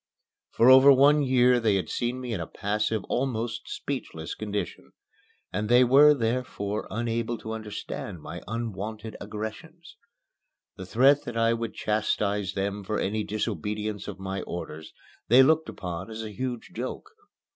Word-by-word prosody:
For 120 +3 +5
over 130 +2 +9
one 145 +3 +6
year 125 -2 +4
they 110 -4 +2
had 95 - -1
seen 120 +1 -2
me 125 -2 -4
in 100 - -2
a 85 - -4
passive, 105 +1 -1
almost 120 -3 -2
speechless 80 - -5
condition, 105 -1 -5 0.6
and 105 +3 -2
they 125 +1 +7
were, 145 +4 +7
therefore, 115 -4 -2
unable 115 0 -2
to 110 - -7
understand 105 -4 -6
my - - -8
unwonted 110 -1 -5
aggressions. 110 - -8 0.8
The 95 - -8
threat 135 +7 +4
that 120 -1 -5
I 115 0 +3
would 115 -1 -4
chastise 105 -2 0
them 100 +1 -2
for 105 +3 -2
any 105 +2 -1
disobedience 105 0 -3
of 100 - -6
my 95 0 -4
orders 80 -2 -7 0.4
they 125 +4 +7
looked 160 +3 +3
upon 90 +1 -6
as 110 0 -6
a 110 - -6
huge 125 +1 -5
joke. 130 - -6
110 Hz, 150 wpm, -27 LUFS, 105-125 Hz, 0.8 s, over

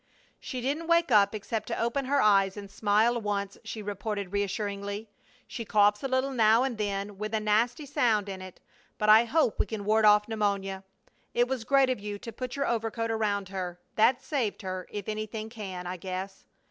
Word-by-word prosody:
"She 255 -2 -5
didn't 290 +6 -2
wake 335 -4 +3
up 205 -1 +5
except 215 +1 -4
to 230 - -3
open 235 +4 0
her 280 +2 +2
eyes 195 -3 +4
and 200 -1 -8
smile 215 +4 +2
once," 200 -1 -3
she 215 - -6
reported, 205 -1 -4
reassuringly. 200 +1 -3 0.4
"She 235 - -6
coughs 210 -1 +3
a 270 - -1
little 260 +1 0
now 225 -1 +4
and 250 -5 -2
then, 200 -1 -3
with 215 +1 -2
a - - +2
nasty 230 +7 +1
sound 225 -7 +1
in 190 -1 -6
it, 185 -1 -10 0.4
but 210 - +1
I 220 +2 +8
hope 300 -2 +1
we - - +2
can 215 -3 -5
ward 215 +1 +3
off 210 0 +6
pneumonia. 200 -3 -1 0.5
It 240 +1 +3
was 255 -3 -2
great 275 0 +4
of 255 - -2
you 205 0 -5
to 230 - -8
put 250 +2 -5
your 280 0 0
overcoat 230 0 -1
around 205 -3 -1
her. 180 -2 -5
That 250 +4 +3
saved 260 -7 -2
her, 185 -1 -4
if 205 -2 -6
anything 215 0 -4
can, 190 -6 -6
I 180 +1 -4
guess. 190 +2 -6
215 Hz, 200 wpm, -28 LUFS, 200-235 Hz, 0.5 s, I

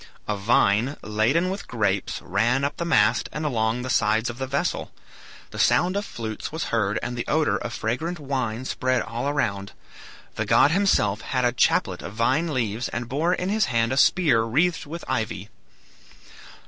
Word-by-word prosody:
A 105 - 0
vine, 110 +4 +2
laden 120 +13 +1
with 200 +1 -6
grapes, 100 -4 -1
ran 125 +4 +1
up 140 - -2
the 170 - -2
mast, 170 - +2
and 155 +1 -4
along 115 -3 0
the 130 - -5
sides 110 +2 +2
of 120 - -13
the 130 - -3
vessel. 140 +6 -2 0.6
The - - -7
sound 180 +2 +3
of 200 +1 -1
flutes 110 - -6
was 160 +2 -3
heard 105 -3 +1
and 120 0 -3
the 120 - -4
odor 155 0 +2
of - - -5
fragrant 155 +11 -2
wine 130 -4 -3
spread 130 -1 0
all 120 +4 -3
around. 100 -9 -2 0.6
The - - -2
god 145 - +5
himself 135 - +2
had 125 -1 -1
a 120 - +3
chaplet 120 - +1
of 100 - -7
vine 135 +9 +1
leaves, 120 -3 -2
and 120 0 -4
bore 160 +8 +1
in 180 - -3
his 215 +1 +2
hand 115 0 0
a - - -2
spear 145 -6 +4
wreathed 155 +9 0
with 170 +3 -7
ivy. 105 -2 -3
125 Hz, 180 wpm, -24 LUFS, 110-155 Hz, 0.6 s, god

